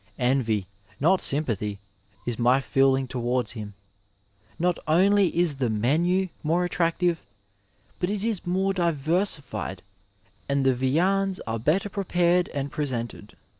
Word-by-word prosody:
Envy, 125 -6 +1 0.3
not 180 +6 +3
sym 150 +3 +2
pathy, 105 -4 -2 0.5
is 120 -1 -3
my 125 +3 +4
feeling 135 0 +2
towards 125 0 -1
him. 105 -4 -8 0.8
Not 175 0 0
only 195 +5 +4
is 170 -5 +2
the 130 -3 0
menu 165 - +1
more 170 +3 +1
attractive, 170 -1 0 0.8
but 180 - 0
it 205 0 -2
is 220 -6 -1
more 190 +2 +1
diversified 155 - -1 0.7
and 140 -1 +1
the 130 - +4
viands 185 +10 +1
are 115 0 -3
better 155 - +1
prepared 180 -3 +1
and 140 -1 -4
presented. 125 -7 -4
150 Hz, 130 wpm, -25 LUFS, 125-180 Hz, 0.8 s, my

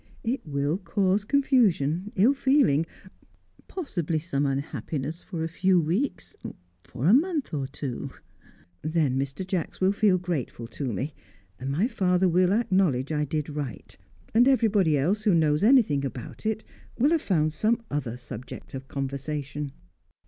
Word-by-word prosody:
It 245 +4 -1
will 145 +3 -1
cause 195 0 +1
confusion, 210 - +2
ill 220 +9 +5
feeling, 265 - +3 0.8
possibly 175 - -2
some 145 -3 -1
unhappiness, 140 +3 -3
for 170 -4 -5
a - - 0
few 180 +2 +2
weeks, 180 - -2 0.5
for 125 +2 -5
a 185 - +6
month 305 - +2
or 140 -3 -1
two; 135 -2 -5 0.7
then 155 -4 +1
Mr. 135 +6 -2
Jacks 185 -3 -3
will 190 +1 +3
feel 200 -2 +3
grateful 170 -9 -4
to 135 -2 -4
me, 135 +8 -3 0.5
and 130 - -4
my 165 +11 +1
father 185 -5 +2
will 180 +1 +3
acknowledge 185 - +2
I 150 -1 0
did 150 +1 -2
right; 145 - -6 0.4
and 240 +3 +5
everybody 210 - +3
else 185 +10 +1
who 210 -5 +3
knows 150 -2 +3
anything 210 - +4
about 130 - -6
it 220 0 -1 0.3
will 280 +6 +3
have 330 -2 +3
found 155 -5 +1
some 225 +8 +1
other 125 -5 -2
subject 120 -1 -9
of 135 0 -7
conversation." 140 +1 -4
165 Hz, 150 wpm, -26 LUFS, 140-205 Hz, 0.8 s, a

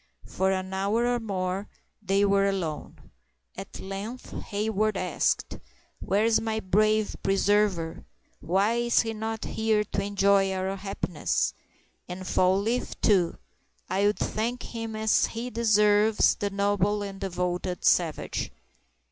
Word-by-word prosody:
For 190 +1 0
an 190 0 -3
hour 200 +5 +1
or 245 0 +1
more 195 -2 -3 0.3
they 200 0 +2
were 200 0 +3
alone. 180 -6 -4 0.4
At - - -8
length 200 +6 -6
Hayward 215 0 0
asked: 180 - -1 0.4
"Where 205 +3 +1
is 230 -1 +3
my 220 -1 -1
brave 215 +2 +2
preserver? 195 -4 +1 0.4
Why 195 +7 +1
is 240 0 +3
he 225 -1 -3
not 220 0 -4
here 220 -1 +1
to 200 - -3
enjoy 200 -1 +3
our 190 +1 -2
happiness? 195 -4 -2 0.6
And 185 +1 -6
Fall 185 +1 +3
leaf, 230 +5 -2
too; 185 -5 +2 0.5
I 195 +2 +2
would 210 - +1
thank 235 +3 -2
him 225 -1 -5
as 220 0 +2
he 235 +2 -5
deserves, 210 -1 +4
the 205 - -3
noble 200 +1 +1
and 195 -1 -7
devoted 180 -1 -2
savage." 165 -4 +1
200 Hz, 130 wpm, -27 LUFS, 190-220 Hz, 0.6 s, deserves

